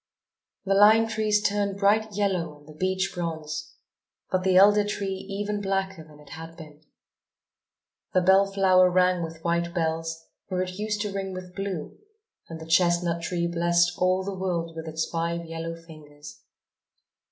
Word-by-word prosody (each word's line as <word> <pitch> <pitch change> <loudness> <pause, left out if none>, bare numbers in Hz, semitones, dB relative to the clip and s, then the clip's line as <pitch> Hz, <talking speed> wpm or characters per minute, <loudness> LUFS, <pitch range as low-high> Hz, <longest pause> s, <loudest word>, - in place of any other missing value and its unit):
The 195 - +2
lime 215 +3 +6
trees 215 -1 +1
turned 200 -1 -1
bright 210 +1 +2
yellow 185 -7 -1
and 145 0 -21
the 155 - -12
beech 185 +4 -1
bronze, 160 -2 -5 0.6
but 185 - +1
the 190 -1 +2
elder 205 +2 +6
tree 195 -2 -4
even 205 +1 -3
blacker 195 -3 -2
than 150 -1 -17
it 150 -1 -16
had 165 +1 -9
been. 155 -2 -13 1.3
The 185 - +5
bell 190 +2 +5
flower 185 -2 +4
rang 180 0 +2
with 165 0 -7
white 170 0 -1
bells, 165 0 -2 0.2
where 185 -1 -1
it 185 +1 -7
used 210 -1 -2
to 205 -2 -3
ring 195 -1 -4
with 185 -1 -8
blue, 195 -5 -5 0.5
and 165 -1 -7
the 160 - -9
chestnut 170 0 +2
tree 170 +1 -2
blessed 170 0 +2
all 185 +1 +2
the 200 +1 -4
world 175 -3 -3
with 160 0 -7
its 160 0 -2
five 170 0 -2
yellow 165 0 -5
fingers. 150 -3 -13
180 Hz, 165 wpm, -26 LUFS, 165-195 Hz, 1.3 s, lime